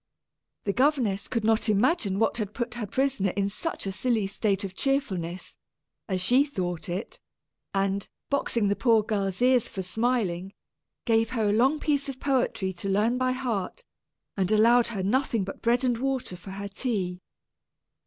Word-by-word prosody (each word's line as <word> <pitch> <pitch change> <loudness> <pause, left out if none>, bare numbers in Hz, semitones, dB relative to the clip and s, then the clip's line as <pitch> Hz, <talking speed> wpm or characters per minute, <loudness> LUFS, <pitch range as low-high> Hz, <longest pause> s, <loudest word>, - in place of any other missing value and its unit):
The 200 - 0
governess 250 -7 +1
could 230 -3 -2
not 220 +1 +2
imagine 210 - +2
what 225 +2 +1
had 210 -3 -3
put 240 -1 -3
her 235 -3 -4
prisoner 260 -4 +1
in 200 0 +1
such 325 +8 -3
a 195 - -2
silly 225 +1 0
state 200 0 0
of 190 -2 -5
cheerfulness, 190 -10 -2 0.5
as 185 -1 0
she 245 +9 +5
thought 180 - -4
it; 185 +6 -4 0.5
and, 195 0 -1 0.2
boxing 235 -6 +1
the 200 - +2
poor 225 -3 +3
girl's 200 0 -1
ears 250 -2 +4
for 190 - -5
smiling, 195 -3 -1 0.5
gave 225 -1 +3
her 225 -4 0
a - - +2
long 265 +7 +3
piece 285 -2 0
of 265 -1 -6
poetry 245 -8 0
to 185 +2 -5
learn 220 +6 +2
by 255 0 +2
heart, 250 - -3 0.5
and 195 0 0
allowed 230 +3 +5
her 205 -5 -3
nothing 230 0 +1
but 195 - -7
bread 240 +2 +2
and 245 -3 +1
water 265 -7 -2
for 180 +2 -11
her 200 +1 -5
tea. 195 -4 -2
220 Hz, 170 wpm, -27 LUFS, 195-250 Hz, 0.5 s, she